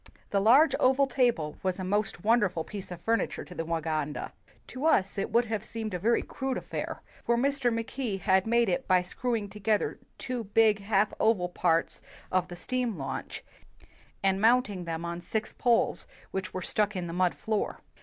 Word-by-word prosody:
The 200 - +3
large 260 +9 +6
oval 265 +2 +4
table 240 - 0
was 185 -1 -1
a 190 - -4
most 195 -1 -1
wonderful 210 -7 +2
piece 200 +3 -7
of 180 -1 -7
furniture 230 +5 0
to - - -11
the 165 - -3
Waganda. 160 -2 -2 0.3
To 270 +5 -2
us 195 -11 +3
it - - -1
would 235 +2 +3
have 220 -2 -3
seemed 220 -2 -5
a 180 - -2
very 230 +6 +2
crude 265 -1 -3
affair, - - -5 0.2
for 235 - +2
Mr. 270 -1 +1
Mackay 230 -1 -2
had 190 +1 +2
made 235 0 +3
it 190 +8 -1
by 185 -1 +4
screwing 230 +2 -2
to 210 - -10
91 - - -16
WHITE 195 - -18
MAN 215 - +6
OF - - -1
WORK - - -15
gether - - -30
two 250 -2 -4
big 220 -2 +5
half 200 0 +1
oval 195 -6 +2
parts 165 -2 +1 0.3
of 185 -1 +1
the 175 - -8
steam 245 +2 -2
launch, 135 - -5 0.8
and 195 0 +2
mounting 220 -6 +3
them 165 0 -4
on 170 0 -4
six 215 +5 -3
poles 240 -2 +1 0.2
which 190 -1 -3
were 185 - -4
stuck 210 0 0
in 180 -2 -2
the 170 - -5
mud 180 0 +1
floor. 215 -1 -2
205 Hz, 205 wpm, -29 LUFS, 180-235 Hz, 0.8 s, large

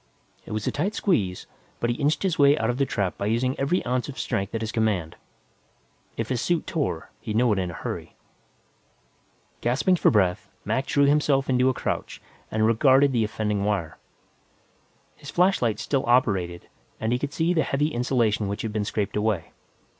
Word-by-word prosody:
It - - -8
was 110 -1 -3
a - - 0
tight 190 +9 -2
squeeze, 100 - 0 0.3
but 120 - 0
he - - -1
inched 145 +6 +1
his 185 -5 0
way 140 +1 +6
out 115 -2 +1
of 125 - -5
the 140 - +2
trap 100 -5 -2
by 100 - -1
using 120 +4 +1
every 150 +7 0
ounce 125 +2 -1
of 135 - -8
strength 100 +3 -2
at 115 - -2
his 110 -1 -3
command. 105 -8 0 1.0
If 115 -1 -3
his 125 -3 -1
suit 175 -2 0
tore, 135 - -3
he'd 110 -1 -5
know 120 -1 +3
it 100 - -1
in 90 -1 -2
a - - -7
hurry. - - -6 1.5
Gasping 145 +10 +2
for - - +4
breath, 95 -5 +1 0.2
Mac 135 +1 -1
drew 140 +1 +3
himself 140 -2 +2
into 125 0 +3
a - - +1
crouch - - -3 0.3
and 110 0 +1
regarded 130 +5 +4
the 120 -3 +1
offending 105 -2 -1
wire. 100 -6 -2 1.2
His 145 - -10
flashlight 175 - +2
still 135 -2 -1
operated, 95 -8 +1 0.3
and 110 +1 -1
he 125 - 0
could 145 +1 -3
see 165 +3 +1
the 165 - +2
heavy 145 +1 0
insulation 120 -5 0
which 100 +1 -4
had 110 -2 -3
been 105 -1 -1
scraped 105 -1 -2
away. 105 -4 -1
120 Hz, 190 wpm, -25 LUFS, 105-140 Hz, 1.5 s, way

